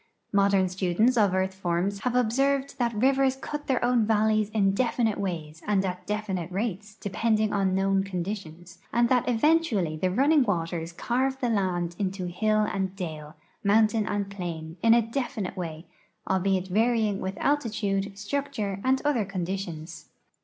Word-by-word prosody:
Modern 200 -1 +4
students 190 +6 +1
of 210 -5 +4
earth 190 0 0
forms 190 +1 -1
have 250 +3 -1
observed 270 +4 +1
that 240 -1 +1
rivers 265 +3 +3
cut 295 +2 -6
their 255 -2 +1
own 245 -2 +3
valleys 215 -1 +2
in 205 -3 +2
definite 230 0 0
wa}^s 165 -5 -4
and 200 -2 +2
at 180 -1 -5
definite 195 -5 -3
rates 210 +1 -3
depend 215 +2 0
ing 215 -1 +1
on 195 -2 +1
known 195 0 +2
conditions, 180 -2 -6
and 235 +1 +3
that 250 -1 +2
eventually 235 - +2
the 185 +4 0
running 280 +10 +4
waters 170 -6 -1
carve 260 +9 -1
the 245 - 0
land 180 -5 0
into 190 -2 -2
hill 215 +5 +1
and 195 -2 -1
dale, 155 -4 -6 0.3
mountain 215 +1 +3
and 200 -1 -2
plain, 165 -4 -6
in 230 0 +6
a 235 - +4
defi 245 0 -3
nite 185 - -4
way, 165 -2 -6 0.4
albeit 190 0 +1
varying 220 0 +2
with 190 +1 -4
altitude, 205 -8 -1
structure, 210 -4 -3
and 260 +1 +2
other 280 -7 +2
con 190 -3 -3
ditions. 165 -4 -6
200 Hz, 160 wpm, -27 LUFS, 185-230 Hz, 0.4 s, in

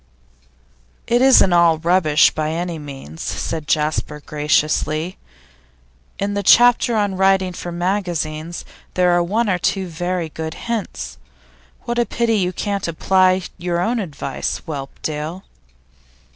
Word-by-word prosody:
'It 240 +1 +2
isn't 260 -8 +6
all 170 -2 +5
rubbish, 160 -2 +4
by 155 0 -2
any 170 0 -3
means,' 135 - -9
said 160 -2 -4
Jasper, 150 -1 0
graciously. 155 +3 0 1.0
'In 200 +1 -2
the 200 - -1
chapter 240 +3 +5
on 205 -3 0
writing 190 -1 +2
for 175 0 -6
magazines, 175 -3 -2 0.3
there 180 -1 +3
are 175 0 +3
one 215 +7 0
or 185 -3 +1
two 190 +2 0
very 175 0 -3
good 160 +1 -6
hints. 195 - -5 0.6
What 240 0 -2
a 240 - +3
pity 230 -2 +1
you 180 -2 0
can't 200 0 -3
apply 185 +2 +2 0.2
your 175 0 -1
own 230 +7 0
advice, 150 -8 -4
Whelpdale! 155 +4 -5
175 Hz, 130 wpm, -20 LUFS, 155-195 Hz, 1.0 s, isn't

